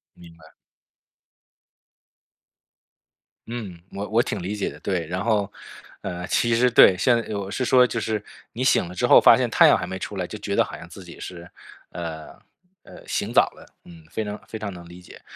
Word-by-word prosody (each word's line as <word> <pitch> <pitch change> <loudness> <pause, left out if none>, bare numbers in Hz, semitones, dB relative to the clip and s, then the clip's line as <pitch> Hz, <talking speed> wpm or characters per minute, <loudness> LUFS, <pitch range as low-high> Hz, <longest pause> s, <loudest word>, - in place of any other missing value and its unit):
明 85 -1 -15
白。 80 0 -18 3.0
嗯， 110 -7 -7
我 100 +1 -5
我 115 +2 +3
挺 105 -4 -4
理 95 +4 -4
解 105 - -2
的。 - - -12
对， 90 -5 -2
然 90 +3 -3
后 105 -4 0 0.5
呃， 90 +1 -5
其 120 +4 +1
实 125 +2 +4
对 95 -5 +7
现 120 +6 +3
在 110 - -6
我 100 -1 -4
是 125 +5 -2
说 125 0 +5
就 115 - -3
是 110 -1 -2 0.3
你 125 - -3
醒 130 - +3
了 90 - -9
之 90 - 0
后， - - +8
发 - - +7
现 - - 0
太 - - +6
阳 - - +5
还 90 - -4
没 95 +1 -5
出 100 +1 -6
来 90 -2 -3
就 105 - -7
觉 100 -1 -3
得 - - +4
好 - - -8
像 85 - -11
自 90 +3 -12
己 85 -1 -13
是， 90 -1 -9 0.4
呃， 80 -2 -7 0.4
呃， - - -14
醒 - - -2
早 - - +7
了， - - -16 0.2
嗯， 85 -2 -15
非 110 - -2
常 105 0 -6
非 110 - -7
常 100 -2 -5
能 85 -1 -11
理 90 +1 -13
解。 90 - -15
100 Hz, 225 characters per minute, -23 LUFS, 90-110 Hz, 3.0 s, 后